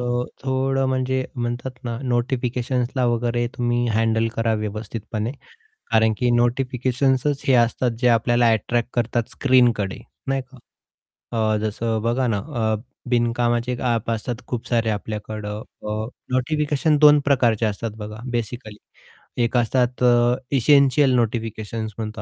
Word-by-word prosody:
अ, 120 Hz, 0 st, 0 dB, 0.2 s
थोडं 135 Hz, 0 st, +1 dB
म्हणजे 130 Hz, 0 st, 0 dB
म्हणतात 120 Hz, +1 st, -4 dB
ना, 115 Hz, -1 st, -3 dB
नोटिफिकेशन्सला 125 Hz, 0 st, -1 dB
वगैरे 120 Hz, 0 st, 0 dB
तुम्ही 120 Hz, 0 st, 0 dB
हँडल 115 Hz, 0 st, +2 dB
करा 115 Hz, -1 st, +1 dB
व्यवस्थितपणे. 110 Hz, +1 st, -4 dB, 0.6 s
कारण 110 Hz, 0 st, +4 dB
की, 125 Hz, -, +1 dB
नोटिफिकेशन्संच 130 Hz, +3 st, +1 dB
हे 135 Hz, -, +5 dB
असतात, 120 Hz, +1 st, +3 dB
जे 125 Hz, -, +3 dB
आपल्याला 120 Hz, 0 st, +3 dB
अट्रॅक्ट 115 Hz, +2 st, 0 dB
करतात 120 Hz, -1 st, -1 dB
स्क्रीनकडे, 120 Hz, -7 st, +2 dB, 0.3 s
नाही 135 Hz, 0 st, 0 dB
का? 130 Hz, +1 st, -17 dB, 1.0 s
अ, -, -, +2 dB
जसं 110 Hz, +1 st, -1 dB
बघा 120 Hz, +3 st, +1 dB
ना 110 Hz, -3 st, +1 dB
अ, 110 Hz, -4 st, -1 dB, 0.3 s
बिनकामाचे 120 Hz, 0 st, +1 dB
एक 125 Hz, -, -4 dB
ॲप 115 Hz, -3 st, 0 dB
असतात 115 Hz, +2 st, -2 dB
खूप 120 Hz, -2 st, -4 dB
सारे 115 Hz, -2 st, +1 dB
आपल्याकडं. 105 Hz, 0 st, -4 dB, 0.2 s
अ, 110 Hz, +1 st, -3 dB, 0.3 s
नोटिफिकेशन 150 Hz, +3 st, +1 dB
2 150 Hz, 0 st, +7 dB
प्रकारचे 120 Hz, -5 st, +3 dB
असतात 110 Hz, +1 st, -2 dB
बघा, 105 Hz, 0 st, -7 dB
बेसिकली. 115 Hz, -2 st, -4 dB, 0.7 s
एक 115 Hz, -, 0 dB
असतात 125 Hz, +1 st, +1 dB
अ, 120 Hz, 0 st, +4 dB, 0.2 s
इसेंशियल 140 Hz, 0 st, +4 dB
नोटिफिकेशन्स 110 Hz, -2 st, -2 dB
म्हणतो 110 Hz, -1 st, -5 dB
120 Hz, 130 wpm, -22 LUFS, 115-130 Hz, 1.0 s, 2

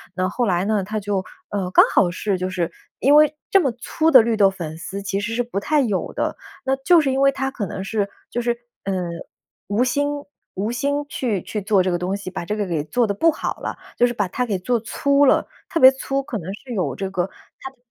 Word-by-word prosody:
那 185 Hz, 0 st, 0 dB
后 240 Hz, +4 st, -1 dB
来 180 Hz, -2 st, +1 dB
呢， 210 Hz, -2 st, +1 dB
他 215 Hz, +2 st, -3 dB
就 200 Hz, -2 st, -1 dB, 0.3 s
呃， 190 Hz, -3 st, -2 dB
刚 -, -, +8 dB
好 175 Hz, -3 st, +4 dB
是 195 Hz, +1 st, -1 dB
就 185 Hz, +1 st, -2 dB
是 175 Hz, -3 st, -2 dB, 0.3 s
因 280 Hz, +3 st, +5 dB
为 305 Hz, 0 st, +6 dB, 0.2 s
这 390 Hz, -, +7 dB
么 270 Hz, -, +1 dB
粗 315 Hz, +6 st, 0 dB
的 255 Hz, -4 st, +9 dB
绿 225 Hz, -1 st, 0 dB
豆 195 Hz, -2 st, +6 dB
粉 160 Hz, -4 st, -6 dB
丝 195 Hz, +4 st, -6 dB
其 195 Hz, 0 st, -2 dB
实 225 Hz, +3 st, -3 dB
是 245 Hz, -, +1 dB
不 235 Hz, -4 st, -3 dB
太 295 Hz, +7 st, +2 dB
有 210 Hz, -7 st, -1 dB
的， -, -, -2 dB, 0.3 s
那 265 Hz, -, +2 dB
就 330 Hz, +5 st, +5 dB
是 275 Hz, -3 st, 0 dB
因 265 Hz, +1 st, 0 dB
为 275 Hz, 0 st, +5 dB
他 270 Hz, 0 st, -2 dB
可 215 Hz, -, -3 dB
能 190 Hz, -, -5 dB
是 205 Hz, 0 st, -1 dB, 0.2 s
就 240 Hz, -, -3 dB
是， 240 Hz, 0 st, +1 dB, 0.3 s
呃， 195 Hz, -, -1 dB, 0.7 s
无 205 Hz, +5 st, +2 dB
心 285 Hz, +3 st, +1 dB, 0.5 s
无 205 Hz, +5 st, -1 dB
心 285 Hz, +4 st, -1 dB
去 220 Hz, -8 st, -1 dB
去 210 Hz, -, -4 dB
做 200 Hz, -1 st, +3 dB
这 185 Hz, -, 0 dB
个 175 Hz, -, +1 dB
东 185 Hz, +2 st, -1 dB
西， 200 Hz, -, -7 dB
把 180 Hz, -2 st, -5 dB
这 210 Hz, -, -2 dB
个 210 Hz, -, -1 dB
给 160 Hz, -4 st, -1 dB
做 235 Hz, +8 st, +1 dB
得 200 Hz, -, 0 dB
不 330 Hz, +10 st, +4 dB
好 -, -, -3 dB
了， -, -, -4 dB, 0.2 s
就 245 Hz, -, +5 dB
是 240 Hz, -, -3 dB
把 205 Hz, -5 st, -1 dB
它 250 Hz, +6 st, -1 dB
给 205 Hz, -5 st, -1 dB
做 240 Hz, +5 st, 0 dB
粗 280 Hz, +5 st, +2 dB
了， -, -, +3 dB, 0.2 s
特 330 Hz, -, -1 dB
别 260 Hz, 0 st, +9 dB
粗， 270 Hz, +1 st, -2 dB
可 235 Hz, -, -4 dB
能 185 Hz, 0 st, -6 dB
是 245 Hz, +3 st, -9 dB
有 145 Hz, -, -1 dB
这 195 Hz, +3 st, -3 dB
个 180 Hz, -1 st, -1 dB, 0.3 s
它 265 Hz, -, -7 dB
的 -, -, -31 dB
215 Hz, 270 characters per minute, -22 LUFS, 190-265 Hz, 0.7 s, 的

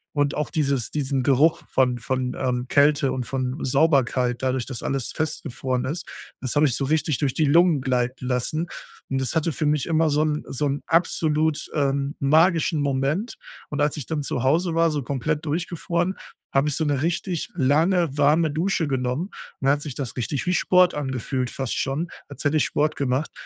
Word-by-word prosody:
Und 145 Hz, 0 st, +1 dB
auch 150 Hz, -, -2 dB
dieses 140 Hz, -7 st, 0 dB
diesen 135 Hz, -3 st, -1 dB
Geruch 145 Hz, +4 st, +3 dB
von 125 Hz, -2 st, +2 dB
von, 130 Hz, +1 st, -2 dB
ähm, 125 Hz, -1 st, -1 dB
Kälte 145 Hz, -1 st, +3 dB
und 125 Hz, -2 st, -3 dB
von 130 Hz, +1 st, -2 dB
Sauberkeit 130 Hz, -3 st, +2 dB
dadurch, 130 Hz, -2 st, 0 dB
dass 130 Hz, -4 st, -5 dB
alles 135 Hz, -2 st, -2 dB
festgefroren 135 Hz, -5 st, -2 dB
ist, 160 Hz, +6 st, -4 dB, 0.3 s
das 130 Hz, +1 st, -2 dB
habe 150 Hz, 0 st, +5 dB
ich 120 Hz, -, 0 dB
so 135 Hz, -, -1 dB
richtig 155 Hz, -1 st, +1 dB
durch 140 Hz, -4 st, 0 dB
die 155 Hz, -, +1 dB
Lungen 165 Hz, -1 st, +4 dB
gleiten 125 Hz, -1 st, -1 dB
lassen. 145 Hz, +7 st, -1 dB, 0.4 s
Und 135 Hz, -, 0 dB
das 130 Hz, -, -2 dB
hatte 160 Hz, +1 st, +1 dB
für 150 Hz, +3 st, -2 dB
mich 150 Hz, +1 st, +1 dB
immer 160 Hz, -1 st, +2 dB
so 150 Hz, +1 st, +2 dB
'n 150 Hz, -1 st, -1 dB
so 145 Hz, +2 st, -1 dB
'n 140 Hz, +1 st, -2 dB
absolut, 160 Hz, -2 st, +1 dB
ähm, 140 Hz, -1 st, 0 dB
magischen 160 Hz, +2 st, +3 dB
Moment. 140 Hz, -, -1 dB, 0.3 s
Und 145 Hz, 0 st, -2 dB
als 150 Hz, +1 st, +1 dB
ich 145 Hz, -, -5 dB
dann 155 Hz, -3 st, -2 dB
zu 125 Hz, -, -2 dB
Hause 165 Hz, +5 st, +2 dB
war, 165 Hz, 0 st, +3 dB
so 150 Hz, -2 st, -1 dB
komplett 150 Hz, +4 st, -2 dB
durchgefroren, 170 Hz, +3 st, -1 dB, 0.4 s
habe 140 Hz, +2 st, +3 dB
ich 145 Hz, -, -1 dB
so 160 Hz, -, 0 dB
'ne 145 Hz, -2 st, 0 dB
richtig 175 Hz, 0 st, -2 dB
lange, 160 Hz, +2 st, +2 dB
warme 150 Hz, +2 st, +3 dB
Dusche 165 Hz, 0 st, 0 dB
genommen 130 Hz, +3 st, -1 dB, 0.4 s
und -, -, -2 dB
dann -, -, +6 dB
hat 145 Hz, -, -2 dB
sich 145 Hz, -5 st, -6 dB
das 135 Hz, -5 st, -4 dB
richtig 135 Hz, +5 st, -2 dB
wie 180 Hz, -, +2 dB
Sport 180 Hz, -1 st, +4 dB
angefühlt 130 Hz, -2 st, -2 dB
fast 135 Hz, -3 st, -3 dB
schon, 145 Hz, +6 st, -1 dB, 0.2 s
als 145 Hz, -, -8 dB
hätte 150 Hz, +2 st, +3 dB
ich -, -, +2 dB
Sport 150 Hz, +1 st, 0 dB
gemacht 135 Hz, +2 st, -1 dB
145 Hz, 195 wpm, -24 LUFS, 130-160 Hz, 0.4 s, dann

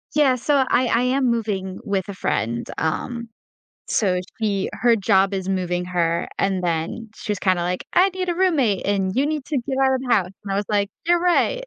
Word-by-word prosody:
Yeah, 285 Hz, -4 st, +4 dB
so 285 Hz, +4 st, 0 dB
I 250 Hz, 0 st, +3 dB
I 230 Hz, 0 st, +2 dB
am 255 Hz, 0 st, +2 dB
moving 200 Hz, -5 st, -2 dB
with 200 Hz, -4 st, -2 dB
a -, -, -4 dB
friend, 120 Hz, -7 st, -1 dB
um, 235 Hz, +9 st, -2 dB, 0.6 s
so 185 Hz, -4 st, +1 dB, 0.2 s
she 200 Hz, -3 st, 0 dB
her 235 Hz, -1 st, +3 dB
job 195 Hz, 0 st, +2 dB
is 190 Hz, -1 st, -3 dB
moving 180 Hz, -2 st, -1 dB
her, 170 Hz, -2 st, 0 dB
and 195 Hz, -2 st, 0 dB
then 170 Hz, +7 st, -2 dB
she 215 Hz, -, -7 dB
was 205 Hz, -, 0 dB
kinda 185 Hz, -2 st, +1 dB
like, 180 Hz, +1 st, -2 dB
"I 370 Hz, +2 st, +5 dB
need 370 Hz, -1 st, -3 dB
a -, -, 0 dB
roommate, 295 Hz, -, +1 dB
and 195 Hz, -2 st, 0 dB
you 275 Hz, +2 st, +2 dB
need 300 Hz, -2 st, -2 dB
to 295 Hz, -, -1 dB
get 265 Hz, +2 st, -3 dB
out 265 Hz, 0 st, +4 dB
of 260 Hz, -, -1 dB
the 255 Hz, -2 st, +2 dB
house." 185 Hz, -3 st, +1 dB
And 195 Hz, -, -3 dB
I -, -, 0 dB
was 205 Hz, -, 0 dB
like, 200 Hz, -1 st, +1 dB, 0.2 s
"You're 345 Hz, 0 st, +4 dB
right." 360 Hz, +8 st, +2 dB
205 Hz, 215 wpm, -22 LUFS, 185-265 Hz, 0.6 s, I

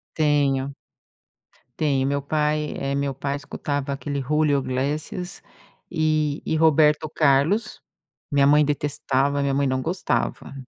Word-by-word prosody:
Tenho, 140 Hz, -3 st, +1 dB, 1.1 s
tenho. 140 Hz, -3 st, +1 dB
Meu 140 Hz, 0 st, -1 dB
pai, 150 Hz, +1 st, 0 dB
eh, 140 Hz, 0 st, -2 dB
meu 140 Hz, 0 st, -1 dB
pai 140 Hz, +1 st, -3 dB
escutava 145 Hz, 0 st, -4 dB
aquele 140 Hz, 0 st, -3 dB
Julio 145 Hz, +1 st, +1 dB
Iglesias 150 Hz, +8 st, -3 dB, 0.5 s
e 155 Hz, -3 st, 0 dB
e 160 Hz, -, 0 dB
Roberto 155 Hz, -1 st, +4 dB
Carlos, 160 Hz, +10 st, +2 dB, 0.5 s
minha 140 Hz, -1 st, +3 dB
mãe 150 Hz, +1 st, +5 dB
detestava, 145 Hz, -1 st, 0 dB
minha 140 Hz, -1 st, 0 dB
mãe 140 Hz, 0 st, +1 dB
não 130 Hz, 0 st, 0 dB
gostava. 170 Hz, -4 st, -2 dB
145 Hz, 125 wpm, -23 LUFS, 140-155 Hz, 1.1 s, mãe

